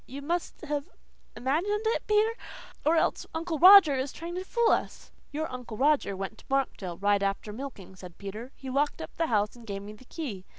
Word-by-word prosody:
You 280 +2 -8
must 345 +3 -3
have 290 -2 -3 0.5
imagined 355 - 0
it, 450 - 0
Peter. 425 +2 +3 0.5
Or 315 +2 +3
else 320 - +1
Uncle 320 -1 -2
Roger 370 -4 +9
is 265 0 -2
trying 335 +1 -7
to 365 +1 -3
fool 470 +4 +2
us." - - -2 0.2
"Your 310 +2 -2
Uncle 245 -3 -7
Roger 275 -8 +2
went 195 +3 -5
to - - -17
Markdale 230 -10 -1
right 200 0 +2
after 200 +1 -2
milking," 220 -7 -8
said 180 -2 -12
Peter. 215 +6 -7
"He 265 -1 -7
locked 285 +3 0
up 160 - -8
the 330 - +1
house 210 -3 +1
and 235 -1 -14
gave 200 -1 -5
me 210 +1 -8
the 215 +4 -16
key. 240 - -6
270 Hz, 205 wpm, -28 LUFS, 205-325 Hz, 0.5 s, Roger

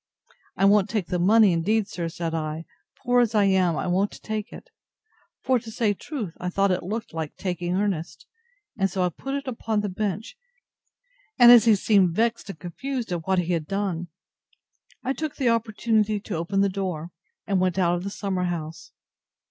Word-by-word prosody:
I 195 - +3
won't 200 -1 +4
take 210 -6 -2
the 180 - -1
money, 205 +1 +5
indeed, 200 +5 +1
sir, 170 -4 -4
said 165 0 -4
I, 160 0 -3 0.4
poor 245 -1 +4
as 230 -2 0
I 210 - +5
am 185 -4 +2
I - - -2
won't 185 +3 0
take 215 +1 -4
it. - - -12 0.7
For, 255 -1 +2
to 230 0 -11
say 220 -1 +1
truth, 215 - -6
I 180 - -2
thought 195 +2 +2
it 180 - 0
looked 220 +4 -5
like 160 -2 -4
taking 175 -2 -3
earnest, 190 -5 -2 0.5
and 195 -3 +1
so 185 0 -1
I 180 - +2
put 270 - -5
it 280 -1 -4
upon 225 -3 -1
the 205 - -2
bench; 210 - -4 1.0
and 240 -2 +9
as 235 -2 +8
he 225 -2 +6
seemed 190 -4 +3
vexed 230 -1 0
and 195 - -7
confused 235 - -5
at 170 -1 -3
what 190 0 +2
he 180 0 0
had 160 -3 -2
done, 195 -4 -2 1.0
I 265 - 0
took 310 0 -4
the 255 -3 +1
opportunity 220 -2 +1
to 205 -2 -5
open 175 +5 0
the 200 - +4
door, 185 -4 -4 0.3
and 195 -2 +1
went 185 0 +1
out 175 -2 +3
of 175 - -4
the 200 - -3
summer 195 -2 -2
house. 160 -3 -5
195 Hz, 195 wpm, -25 LUFS, 175-220 Hz, 1.0 s, and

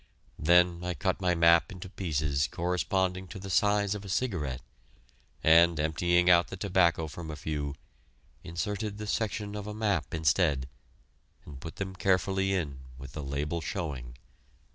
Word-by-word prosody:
Then 85 +2 +4
I 90 -1 -2
cut 75 - -1
my 90 -1 +2
map 85 +4 +5
into 95 0 -8
pieces 75 -7 -1
corresponding 90 +1 -1
to 100 - -9
the 95 0 -7
size 100 +3 +2
of 105 -1 -6
a 100 - -9
cigarette, 90 - -2 0.8
and, 85 0 +6
emptying 85 +3 +2
out 85 -1 +6
the 95 - -7
tobacco 90 -4 +2
from 80 +1 -8
a 75 - -5
few, 75 -2 -4 0.7
inserted 100 +5 -3
the 105 - -5
section 105 -1 -2
of 105 0 -6
map 100 - 0
instead, 75 -3 +2 0.8
and 70 -3 -10
put 80 - -8
them 95 -1 -5
carefully 95 +1 +1
in 80 -8 -2 0.2
with 65 -1 -9
the 75 - -5
label 75 +4 -3
showing. 70 - -5
85 Hz, 150 wpm, -29 LUFS, 75-95 Hz, 0.8 s, and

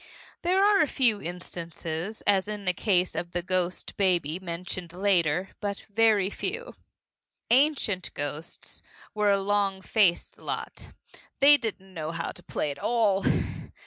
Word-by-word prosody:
There 370 +3 +3
are 410 -3 +5
a 310 - +3
few 235 -7 +2
instances, 170 +2 -6
as 195 -1 +3
in 210 -1 -5
the 180 - +2
case 180 -1 +1
of 170 0 -4
the 175 0 -1
ghost 185 0 -1
baby 175 -4 +2
mentioned 175 -1 -5
later, 180 -2 +1
but 200 -1 -3
very 215 -3 +3
few. 470 - -4 0.8
Ancient 250 - +2
ghosts 145 +3 -6 0.3
were 210 -1 +2
a 200 0 +4
long 200 -1 +1
faced 190 -2 +1
lot. - - -5 0.5
They 290 +1 +8
didn't 200 -7 -4
know 155 -3 -4
how 165 0 -3
to - - -10
play 150 - -2
at 140 - -8
all. 210 -1 +2
190 Hz, 145 wpm, -27 LUFS, 175-215 Hz, 0.8 s, They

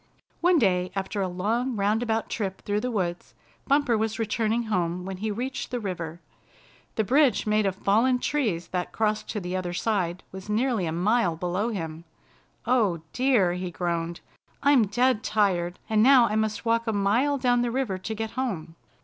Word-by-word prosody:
One 350 0 +4
day, 185 - +2
after 195 +1 -2
a 190 - 0
long 225 +8 -1
roundabout 220 +2 0
trip 195 -4 -4
through 205 0 0
the 250 - -2
woods, 180 -6 -3 0.3
Bumper 280 -4 +3
was 220 0 -1
returning 225 +1 0
home 180 -4 -1
when 190 -1 -5
he 215 +3 -3
reached 250 +5 -4
the 245 - -2
river. 175 -5 -5 0.7
The 220 - +1
bridge 255 -1 +3
made 215 -1 +2
of 190 - -1
fallen 225 +6 +2
trees 225 - -1
that 180 -1 -3
crossed 215 -1 -1
to 215 - -2
the 180 -1 -4
other 180 -1 -3
side 185 -3 -1
was 190 +2 -9
nearly 220 -4 +1
a - - -2
mile 180 +1 +1
below 180 +6 -1
him. 165 -6 -5 0.6
"Oh, 205 -10 +2
dear," 245 -9 +3
he 180 0 -4
groaned, 170 -1 -3 0.4
"I'm 280 -6 +5
dead 240 +2 +2
tired, 185 -5 +1
and 215 -1 +2
now 255 0 +7
I 210 - -2
must 215 0 -1
walk 230 0 +1
a 220 - +1
mile 225 +9 +2
down 245 -2 +2
the 240 - 0
river 235 -6 -1
to 220 +4 -4
get 220 0 -4
home." 195 -11 -3
210 Hz, 180 wpm, -26 LUFS, 180-235 Hz, 0.7 s, now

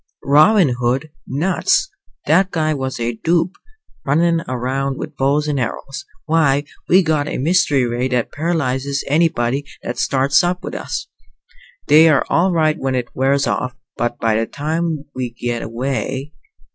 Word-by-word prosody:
"Robin 155 - +5
Hood 130 +5 -1 0.2
nuts! 190 - +1 0.4
That 190 0 +3
guy 155 -3 0
was 130 -2 -4
a 120 0 -1
dope! 170 +2 +1 0.5
Runnin' 165 +4 +2
around 130 +2 -2
with 155 - -7
bows 140 +3 +1
and 145 -2 0
arrows. 135 +3 -4 0.2
Why, 150 -3 +2 0.3
we 185 +2 +6
got 155 -3 0
a - - -3
mystery 145 -3 +2
ray 120 +2 -1
that 125 -3 -1
paralyzes 140 -4 -1
anybody 145 -4 +1 0.2
that 120 - -4
starts 140 +4 +2
up 180 +1 -1
with - - -6
us. - - -4 0.8
They're 155 -1 +6
all 185 +3 +3
right 155 -1 +1
when 135 -1 -1
it 125 -1 -2
wears 135 +1 +2
off, 125 0 -2 0.2
but 120 0 -2
by 115 -1 +1
that 115 0 -2
time 155 0 -2
we 125 -1 -3
get 120 -1 -2
away." 130 +4 -3
140 Hz, 150 wpm, -19 LUFS, 130-160 Hz, 0.8 s, we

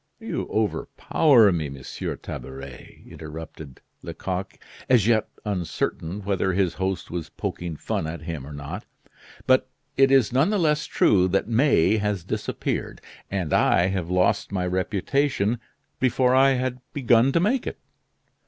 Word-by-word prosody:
"You - - -4
overpower 110 +2 +3
me, 80 -5 -2
Monsieur 70 -2 -6
Tabaret!" 65 -1 -9
interrupted 80 -3 -9 0.2
Lecoq, 95 -1 -5 0.3
as 120 -6 +5
yet 110 -2 +3 0.2
uncertain 90 -1 -3
whether 95 -1 0
his 95 -2 +1
host 95 0 -3
was 85 -2 -4
poking 85 -2 -5
fun 80 - -3
at 80 0 -6
him 80 -5 -5
or - - -9
not. 75 +8 -7 0.6
"But 130 0 +3 0.3
it 135 0 +6
is 135 -4 +4
none 135 +8 +3
the 210 - +1
less 150 -4 +1
true 95 -3 +3
that 95 +2 0
May 115 - +3
has 105 -4 -1
disappeared, - - -3 0.3
and 95 -6 -2
I 90 +2 +4
have 95 -3 -3
lost 90 +3 +1
my 95 -2 -1
reputation 105 +5 0 0.4
before 130 0 +2
I 135 +1 +5
had 130 -1 -2
begun 125 -2 +4
to - - +3
make 225 +9 +1
it." - - -4
100 Hz, 145 wpm, -24 LUFS, 85-130 Hz, 0.6 s, it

